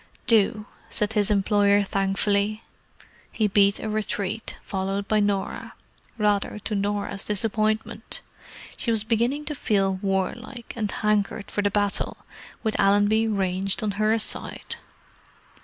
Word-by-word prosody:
"Do," 215 Hz, -1 st, +3 dB, 0.2 s
said 210 Hz, +1 st, -1 dB
his 210 Hz, -1 st, +3 dB
employer 205 Hz, 0 st, +3 dB
thankfully. 200 Hz, +2 st, 0 dB, 0.7 s
He 215 Hz, -2 st, +1 dB
beat 200 Hz, 0 st, +4 dB
a -, -, -4 dB
retreat, 215 Hz, 0 st, -2 dB
followed 195 Hz, +1 st, -2 dB
by 215 Hz, -, +3 dB
Norah—rather 205 Hz, +1 st, -2 dB
to 210 Hz, +1 st, -4 dB
Norah's 205 Hz, 0 st, 0 dB
disappointment. 215 Hz, +1 st, -1 dB, 0.6 s
She -, -, -2 dB
was 220 Hz, -2 st, +2 dB
beginning 235 Hz, +6 st, 0 dB
to 300 Hz, -, -2 dB
feel 195 Hz, -7 st, +1 dB
warlike, 205 Hz, +5 st, -2 dB
and 215 Hz, -3 st, -1 dB
hankered 210 Hz, -1 st, 0 dB
for 205 Hz, -, 0 dB
the 205 Hz, -, +2 dB
battle, 205 Hz, 0 st, 0 dB, 0.5 s
with 220 Hz, -2 st, -1 dB
Allenby 205 Hz, +3 st, +4 dB
ranged 195 Hz, -1 st, 0 dB
on 210 Hz, -, 0 dB
her 215 Hz, +1 st, +4 dB
side. 215 Hz, -, -3 dB
205 Hz, 125 wpm, -25 LUFS, 200-220 Hz, 0.7 s, beat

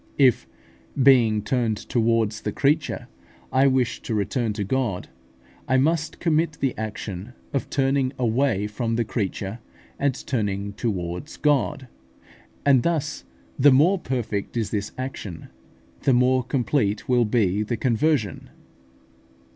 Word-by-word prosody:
If, 130 Hz, -4 st, +4 dB, 0.6 s
being 115 Hz, -6 st, +5 dB
turned 115 Hz, -1 st, 0 dB
towards 115 Hz, -2 st, 0 dB
the 105 Hz, -, -2 dB
creature, 145 Hz, +6 st, 0 dB, 0.4 s
I 135 Hz, +1 st, +4 dB
wish 130 Hz, -2 st, +1 dB
to 115 Hz, -, -3 dB
return 110 Hz, +3 st, 0 dB
to 105 Hz, -1 st, -3 dB
God, 115 Hz, -3 st, -2 dB, 0.6 s
I 130 Hz, -, +3 dB
must 155 Hz, +3 st, 0 dB
commit 160 Hz, -1 st, +1 dB
the 135 Hz, -4 st, -2 dB
action 110 Hz, 0 st, -6 dB, 0.2 s
of 140 Hz, -, -2 dB
turning 135 Hz, -1 st, +1 dB
away 120 Hz, -3 st, +1 dB
from 115 Hz, +2 st, -2 dB
the 115 Hz, 0 st, 0 dB
creature, 105 Hz, 0 st, -3 dB, 0.4 s
and 140 Hz, -3 st, +1 dB
turning 100 Hz, -5 st, -2 dB
towards 95 Hz, -, -4 dB
God; 140 Hz, -2 st, +1 dB, 0.8 s
and 135 Hz, -3 st, +5 dB
thus 155 Hz, -, -1 dB, 0.3 s
the 145 Hz, +2 st, +7 dB
more 165 Hz, +9 st, +4 dB
perfect 120 Hz, -, -3 dB
is 110 Hz, -3 st, -1 dB
this 105 Hz, -1 st, -2 dB
action, 120 Hz, -10 st, -6 dB, 0.5 s
the 135 Hz, -, +3 dB
more 125 Hz, +1 st, +4 dB
complete 120 Hz, -4 st, 0 dB
will 125 Hz, -2 st, +3 dB
be 105 Hz, -3 st, +1 dB
the 115 Hz, +2 st, -2 dB
conversion. 120 Hz, -, 0 dB
120 Hz, 130 wpm, -24 LUFS, 105-135 Hz, 0.8 s, the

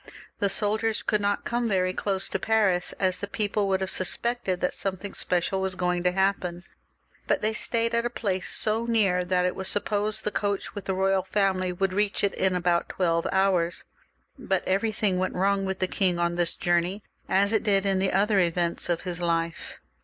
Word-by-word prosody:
The 200 Hz, -, +2 dB
soldiers 215 Hz, +2 st, +1 dB
could 210 Hz, -1 st, 0 dB
not 205 Hz, 0 st, -1 dB
come 240 Hz, -1 st, -1 dB
quite 185 Hz, -2 st, 0 dB
close 195 Hz, -2 st, -1 dB
to -, -, -2 dB
Paris, 205 Hz, -5 st, +1 dB
as 185 Hz, -2 st, 0 dB
the 200 Hz, -, -4 dB
people 205 Hz, -1 st, -1 dB
would 190 Hz, -1 st, 0 dB
have 190 Hz, -, -2 dB
suspected 190 Hz, +1 st, 0 dB
that 180 Hz, -, -1 dB
something 195 Hz, +1 st, -4 dB
special 180 Hz, +2 st, 0 dB
was 190 Hz, -1 st, -1 dB
going 180 Hz, -1 st, 0 dB
to 180 Hz, 0 st, +2 dB
happen, 185 Hz, -2 st, -1 dB, 0.6 s
but -, -, 0 dB
they 215 Hz, +1 st, +1 dB
stayed 230 Hz, +1 st, 0 dB
at 235 Hz, 0 st, +1 dB
a 240 Hz, -, -1 dB
place 195 Hz, -6 st, -2 dB
so 225 Hz, +2 st, +2 dB
near, 200 Hz, -6 st, +2 dB
that 180 Hz, 0 st, +1 dB
it 180 Hz, -, -1 dB
was 190 Hz, -, -3 dB
supposed 210 Hz, +1 st, 0 dB
the 210 Hz, -, -1 dB
coach 200 Hz, -2 st, -2 dB
with 205 Hz, -3 st, -7 dB
the 190 Hz, -, -1 dB
royal 190 Hz, 0 st, +2 dB
family 190 Hz, -1 st, 0 dB
would 185 Hz, +1 st, -1 dB
reach 205 Hz, +1 st, 0 dB
it 200 Hz, -, +2 dB
in 190 Hz, -1 st, +1 dB
about 175 Hz, -1 st, +1 dB
twelve 170 Hz, -2 st, 0 dB
hours. 190 Hz, -3 st, +1 dB, 0.6 s
But 190 Hz, -7 st, -1 dB
everything 200 Hz, -1 st, +1 dB
went 185 Hz, -, -2 dB
wrong 195 Hz, +1 st, +1 dB
with 190 Hz, 0 st, -2 dB
the 185 Hz, -, +1 dB
king 185 Hz, -2 st, +1 dB
on 170 Hz, 0 st, 0 dB
this 175 Hz, -1 st, +1 dB
journey, 175 Hz, +4 st, 0 dB, 0.3 s
as 200 Hz, +3 st, +2 dB
it 220 Hz, -, +3 dB
did 200 Hz, -2 st, +2 dB
in 195 Hz, -1 st, +1 dB
the 190 Hz, 0 st, +1 dB
other 205 Hz, +1 st, +2 dB
events 170 Hz, -1 st, 0 dB
of 170 Hz, -1 st, 0 dB
his 180 Hz, -2 st, -4 dB
life. 165 Hz, -1 st, -2 dB
190 Hz, 200 wpm, -26 LUFS, 180-205 Hz, 0.6 s, it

